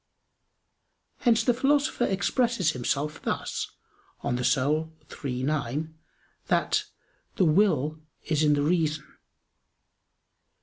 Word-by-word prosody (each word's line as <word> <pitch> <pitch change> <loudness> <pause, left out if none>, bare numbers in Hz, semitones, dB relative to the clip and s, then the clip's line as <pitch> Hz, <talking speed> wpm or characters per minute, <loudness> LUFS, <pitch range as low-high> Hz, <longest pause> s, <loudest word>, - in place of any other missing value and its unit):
Hence 235 -3 +3
the 245 - +3
Philosopher 275 0 +2
expresses 200 - +1
himself 140 +3 -2
thus - - -2 0.6
(De - - -1
Anima 135 +6 +1 0.3
iii, 125 -2 -2
9) 150 +2 -2 0.5
that - - +1 0.5
"the 185 - +3
will 155 -3 +2 0.2
is 155 -2 0
in 150 -1 +4
the 145 - +1
reason." 155 -2 +1
155 Hz, 95 wpm, -27 LUFS, 145-195 Hz, 0.6 s, in